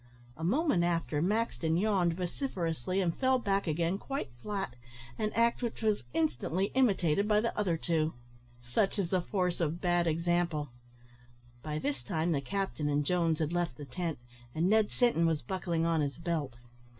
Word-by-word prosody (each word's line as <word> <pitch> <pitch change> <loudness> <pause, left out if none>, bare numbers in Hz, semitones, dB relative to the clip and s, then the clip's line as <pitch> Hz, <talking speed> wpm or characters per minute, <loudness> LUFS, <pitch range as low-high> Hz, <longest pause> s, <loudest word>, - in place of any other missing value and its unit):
A 160 - -8
moment 235 - +2
after, 165 -3 0
Maxton 170 - +1
yawned 185 -4 +2
vociferously, 180 - -2
and 170 -3 0
fell 260 -1 +3
back 200 -5 0
again 170 +4 0
quite 270 - -4
flat, 195 -8 -3 0.4
an 215 0 0
act 235 +2 +3
which 235 -1 -3
was 215 -5 +2
instantly 165 +5 0
imitated 200 -7 +3
by 210 -1 +4
the 230 +2 -1
other 185 -6 +1
two. 160 -2 0 0.5
Such 195 - +1
is 185 -4 -1
the 185 -2 +2
force 180 -1 -1
of 165 0 0
bad 175 -1 +2
example. 165 -2 0 0.9
By 150 +3 -3
this 145 -4 -2
time 160 +7 -1
the 140 -4 +1
captain 160 0 -2
and 145 0 +1
Jones 165 -1 +2
had 155 +1 -1
left 175 -8 -1
the 145 - -7
tent, 165 +4 -3 0.4
and 165 +3 +2
Ned 215 +1 +4
Sinton 235 -10 +2
was 160 -5 0
buckling 170 +2 -1
on 165 -2 +2
his 140 -3 -2
belt. 160 -7 -2
175 Hz, 170 wpm, -31 LUFS, 160-200 Hz, 0.9 s, by